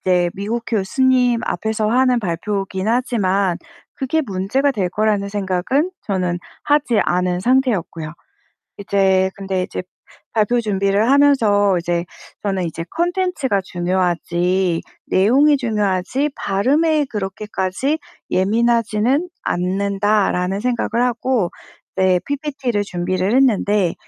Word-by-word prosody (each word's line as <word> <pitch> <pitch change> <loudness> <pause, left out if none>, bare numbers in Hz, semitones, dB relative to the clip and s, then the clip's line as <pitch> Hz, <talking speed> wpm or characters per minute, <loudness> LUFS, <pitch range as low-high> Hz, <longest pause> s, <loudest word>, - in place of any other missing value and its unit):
이제 180 -1 +2
미국 215 +4 -3
교수님 245 +3 +2
앞에서 220 +3 -1
하는 250 +1 +3
발표이기는 195 +2 -2
하지만 200 -7 +1 0.4
그게 310 +3 -1
문제가 205 +8 0
될 200 -9 -1
거라는 205 +1 0
생각은 200 - 0 0.2
저는 180 -3 -1 0.2
하지 290 -6 +2
않은 180 0 0
상태였고요. 205 - 0 0.7
이제 190 -2 +2
근데 190 -2 -2
이제 - - -5 0.5
발표 225 +2 +2
준비를 200 +1 +1
하면서 225 -9 +4
이제 170 0 -1 0.4
저는 195 -3 -1
이제 165 0 -4
'콘텐츠가 345 - 0
중요하지 180 0 0 0.3
내용이 270 +10 +4
중요하지 215 +4 0
발음에 290 +10 +1
그렇게까지 210 +6 -2 0.3
예민하지는 230 - +1
않는다.'라는 195 0 0
생각을 240 0 0
하고 245 -5 0 0.5
네 190 -1 +3
PPT를 275 -6 -2
준비를 185 +2 -1
했는데 210 -8 +2
205 Hz, 280 characters per minute, -19 LUFS, 185-250 Hz, 0.7 s, 하면서